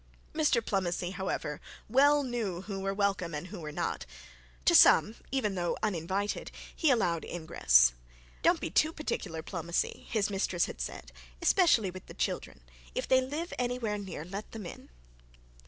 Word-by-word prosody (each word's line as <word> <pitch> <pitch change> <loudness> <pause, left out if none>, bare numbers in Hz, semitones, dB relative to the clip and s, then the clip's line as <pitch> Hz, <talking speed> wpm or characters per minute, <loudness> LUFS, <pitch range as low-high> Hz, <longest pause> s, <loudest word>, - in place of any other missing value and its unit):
Mr 300 -7 +2
Plomacy, 180 -2 -1
however, 180 -5 -3 0.3
well 285 +5 +5
knew 225 -9 -3
who 195 0 -5
were 195 0 -1
welcome 195 -5 0
and 150 +5 -5
who 200 -1 -7
were 155 -2 -6
not. 65 - -3 0.6
To - - +5
some, 215 - +7 0.2
even 255 -7 0
though 175 -2 -1
uninvited, 195 +1 -1 0.3
he 320 - +2
allowed 180 -10 +2
ingress. 60 - +4 0.5
'Don't - - +4
be 160 - -4
too 310 - +3
particular, 185 - -4
Plomacy,' 170 -1 -3
his 210 -3 0
mistress 190 -3 +1
had - - -7
said; - - -6 0.3
'especially 240 - +4
with 185 0 -11
the - - -11
children. - - -3 0.3
If - - -2
they 260 0 +5
live 300 +7 -4
anywhere 245 -4 -1
near, 190 -6 -6
let 195 +4 -7
them 220 -4 -6
in.' - - -9
195 Hz, 155 wpm, -30 LUFS, 170-235 Hz, 0.6 s, some